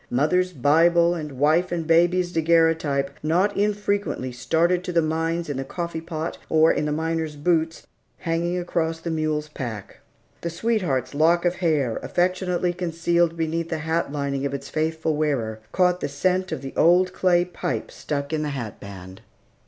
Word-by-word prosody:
Mother's 180 +8 +2
Bible, 170 +4 +4
and 155 -4 -5
wife 155 +7 +2
and 170 -2 -2
baby's 175 +2 +3
daguerreotype 160 -4 +2
not 180 +7 +1
infrequently 205 -9 -1
started 165 +8 +1
to 180 - -4
the 170 - +3
mines 165 +2 -1
in 145 -3 -3
the 135 - -2
coffee 170 +3 -4
pot, 165 -1 -5
or 160 0 +5
in 150 - -1
the 150 - -1
miner's 160 0 -2
boots, 160 +1 0 0.3
hanging 170 +2 -1
across 165 -2 -1
the 165 0 -4
mule's 155 -1 -1
pack. 115 -8 -7 0.4
The 170 - -2
sweetheart's 170 - -1
lock 165 +4 +3
of 175 0 +1
hair, 150 -10 +1
affectionately 180 0 0
concealed 170 -1 0
beneath 165 +1 -2
the 160 - -1
hat 160 -2 0
lining 140 -2 -2
of 140 0 -1
its 140 0 -7
faithful 160 0 -1
wearer, 130 -8 -1
caught 180 -1 +2
the - - -3
scent 185 +6 0
of 150 -4 -4
the 135 - -6
old 180 +2 +4
clay 175 -2 +3
pipe 180 0 -4
stuck 140 0 -4
in 155 - 0
the 150 - -2
hat 120 -7 -5
band. 95 -1 -10
165 Hz, 170 wpm, -24 LUFS, 150-175 Hz, 0.4 s, or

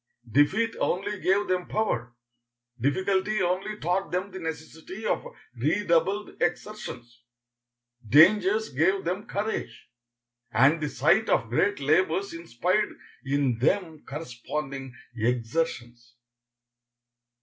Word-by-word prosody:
Defeat 190 - +2
only 200 +2 -1
gave 200 +2 +2
them 180 -1 -1
power; 120 - -1 0.6
difficulty 190 - +1
only 185 +4 -1
taught 180 0 -1
them 185 +3 -2
the 190 - -7
necessity 160 +5 -7
of - - 0 0.3
redoubled 170 - 0
exertions; 120 - -4 0.9
dangers 195 - +5
gave 180 +8 +1
them 185 +5 -3
courage, 210 - -4 0.6
and 140 +7 +4
the 150 - -1
sight 220 +8 +2
of 115 - +2
great 200 - +1
labors 165 +6 +1
inspired 170 - -1 0.3
in 135 -4 +1
them 160 +3 0
corresponding 135 -1 -6 0.2
exertions. 120 0 -2
165 Hz, 100 wpm, -27 LUFS, 135-195 Hz, 0.9 s, dangers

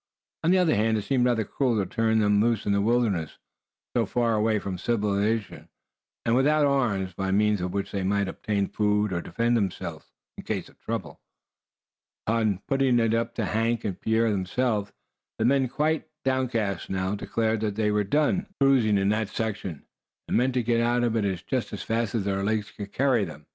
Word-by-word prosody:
On 165 - +2
the 185 - +5
other 180 -4 +3
hand, 110 +1 +2
it 105 - -2
seemed 125 +3 +1
rather 120 -3 +1
cruel 125 +1 0
to 100 - 0
turn 110 +3 +1
them 105 -1 +3
loose 115 -1 +1
in 100 - +1
the 100 0 +2
wilderness, 105 -7 0 0.6
so - - +2
far 120 -2 +1
away 110 0 +2
from 95 -3 -4
civilization, 105 0 -1 0.6
and 115 - +3
without 150 +3 +3
arms, 110 -10 0
by 95 +2 -3
means 105 0 +2
of 90 0 -2
which 100 +1 -3
they 100 - -2
might 100 +1 +1
obtain 100 +1 -1
food, 105 -1 +1
or 85 - -1
defend 115 +9 0
themselves 95 -6 -3 0.3
in - - -7
case - - -3
of - - -24
trouble. - - -5 1.0
Upon 110 -4 0
putting 135 -3 +2
it 115 -1 +2
up 115 0 -1
to - - -1
Hank 115 +1 0
and 95 -2 -4
Pierre 110 0 +2
themselves, 105 +2 -1 0.5
the 110 - 0
men, 135 +1 +3
quite 155 +5 -1 0.2
downcast 125 -6 -1
now, 95 0 -1
declared 110 +2 -1
that 105 -2 -2
they 105 -1 +1
were 105 0 +2
done 150 - +1
"cruising" 130 -7 +4
in 100 0 +2
that 110 -1 0
section, 100 -9 -4 0.4
and - - -1
meant 125 +1 +2
to 125 - +1
get 115 0 +2
out 120 +1 +2
of 115 -1 +1
it 95 -5 -1
just 130 -3 -2
as - - -5
fast 115 -1 -1
as 110 - 0
their 100 -1 -1
legs 110 +1 -1
could 100 -1 -8
carry 130 -5 +2
them. 75 -4 -8
110 Hz, 195 wpm, -26 LUFS, 100-120 Hz, 1.0 s, the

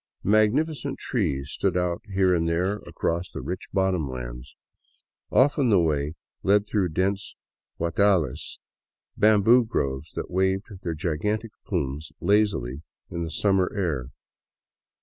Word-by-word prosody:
Magnificent 135 - +2
trees 75 - -2
stood 95 -2 0
out 90 -1 0
here 95 -1 +3
and 85 -1 +1
there 90 +5 0
across 85 +2 -2
the - - -7
rich 90 +1 -5
bottom 95 -7 +1
lands. - - -7 0.7
Often 140 -1 +3
the 100 - +5
way 75 -2 0 0.3
led 100 +1 +3
through 105 -4 0
dense 95 +5 -1 0.4
gaitdales, 85 -4 +1 0.6
bamboo 110 +3 +5
groves 70 -8 -2
that - - -5
waved 95 +4 0
their 85 -2 -3
gigantic 105 +8 -2 0.2
plumes 70 +3 -2
lazily 95 - +1 0.3
in 85 - -3
the 85 - -3
summer 95 +2 +2
air. 75 - -1
90 Hz, 125 wpm, -25 LUFS, 80-105 Hz, 0.7 s, the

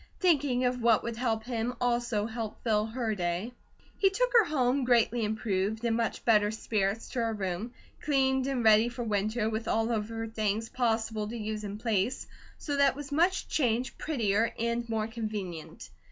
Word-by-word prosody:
Thinking 285 -8 +2
of 250 0 0
what 230 -2 +4
would 235 -1 -3
help 225 -2 -1
him 240 +1 -2
also 240 -3 0
helped 225 -1 -5
fill 215 -2 +1
her 225 -1 -2
day. 180 +4 -2 0.5
He 390 - +5
took - - 0
her 460 -4 +7
home, 270 -3 +1
greatly 240 -1 +3
improved, 215 0 -1
in 230 - +2
much 230 -1 -2
better 210 -3 +4
spirits, 215 -1 -1
to 250 - -3
her 230 -1 0
room, 195 +2 -3 0.3
cleaned 265 -2 +2
and 265 -3 -1
ready 220 +1 +6
for 240 0 -5
winter, 215 +1 0
with 220 0 -3
all 225 +1 +1
of 215 -1 -1
her 225 0 -4
things 220 0 -2
possible 225 -3 -1
to 235 +2 -5
use 215 -1 -4
in 205 0 -5
place, 220 +1 -1 0.3
so 285 -2 -3
that 280 -1 +4
it - - -18
was 290 0 -8
much 350 +6 +2
changed, 250 -3 0
prettier, 225 -7 +1
and 235 0 -1
more 220 -1 0
convenient. 215 -7 -6
225 Hz, 180 wpm, -29 LUFS, 215-250 Hz, 0.5 s, her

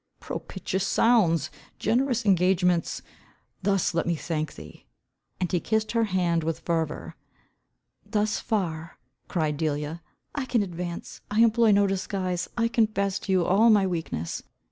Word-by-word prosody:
"Propitious 190 0 -3
sounds! 170 - +3 0.3
Generous 245 -1 +1
engagements! 180 -2 +2 0.6
Thus 195 -2 +1
let 165 - 0
me 170 - +1
thank 155 -1 -3
thee." - - -13 0.5
And 180 -2 -1
he 180 - +2
kissed 220 +3 0
her 230 -1 +2
hand 175 -4 +1
with 165 0 -2
fervour. 165 -3 -2 0.9
"Thus 210 -1 0
far," 170 -7 -2 0.3
cried 155 -4 -1
Delia, 155 +1 -2 0.3
"I 285 -2 -2
can 235 -4 +1
advance. 175 -2 -6
I 210 +2 +2
employ 230 0 +5
no 200 0 +4
disguise. 185 -2 -2
I 230 0 +3
confess 215 -4 +1
to 195 - -4
you 185 -2 +3
all 210 +7 +5
my 205 -3 +5
weakness. 160 - -3
185 Hz, 140 wpm, -26 LUFS, 170-215 Hz, 0.9 s, employ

